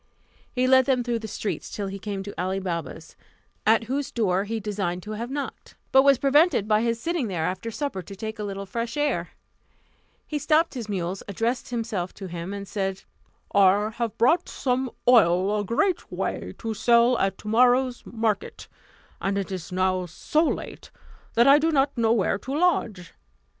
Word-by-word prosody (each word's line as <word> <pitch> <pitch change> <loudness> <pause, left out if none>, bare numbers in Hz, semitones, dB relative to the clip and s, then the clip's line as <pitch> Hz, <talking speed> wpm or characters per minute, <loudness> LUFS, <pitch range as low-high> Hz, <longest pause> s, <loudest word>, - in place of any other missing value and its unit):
He 255 -1 0
led 260 0 +5
them 255 -3 +2
through 240 -1 -1
the 220 - -6
streets, 210 0 -4
till 205 - -4
he 195 0 -5
came 200 -1 -4
to 205 - -7
Ali 185 +2 -1
Baba's, 170 -3 -5 0.5
at 225 +1 +5
whose 270 +4 -2
door 195 -4 +1
he 225 +2 -3
designed 195 -4 -3
to 215 - -7
have 230 +3 -4
knocked; 280 +1 -6 0.2
but 265 - +7
was 275 -1 +5
prevented 280 - +3
by 215 0 +3
his 230 0 0
sitting 330 -3 -1
there 175 -5 -2
after 185 +6 -3
supper 255 -4 -3
to 195 +2 -10
take 220 +2 -6
a - - -3
little 200 -1 -5
fresh 230 +5 -4
air. 295 0 0 1.0
He 300 - -3
stopped 320 +3 +2
his 235 -5 -6
mules, 185 -1 -3
addressed 230 +5 -2
himself 225 -7 -3
to 195 - -8
him, 170 +1 -6
and 200 0 -6
said, 195 -2 -3 0.5
"I 200 +2 +4
have 230 -1 -3
brought 325 +10 +3
some 255 0 -1 0.2
oil 200 -3 +5
a - - -1
great 355 - 0
way, - - -3
to 225 -1 -4
sell 235 +3 +4
at 195 0 0
tomorrow's 245 +3 +2
market; 220 -2 -3 0.5
and 195 +1 0
it 195 -1 -3
is 185 -1 -6
now 185 0 0
so 300 - 0
late - - -4 0.5
that 235 - +5
I 280 +2 +8
do 320 +2 +2
not 275 -1 +2
know 230 -2 +2
where 200 -3 +1
to 270 +6 -4
lodge. 230 - 0
220 Hz, 185 wpm, -25 LUFS, 195-250 Hz, 1.0 s, I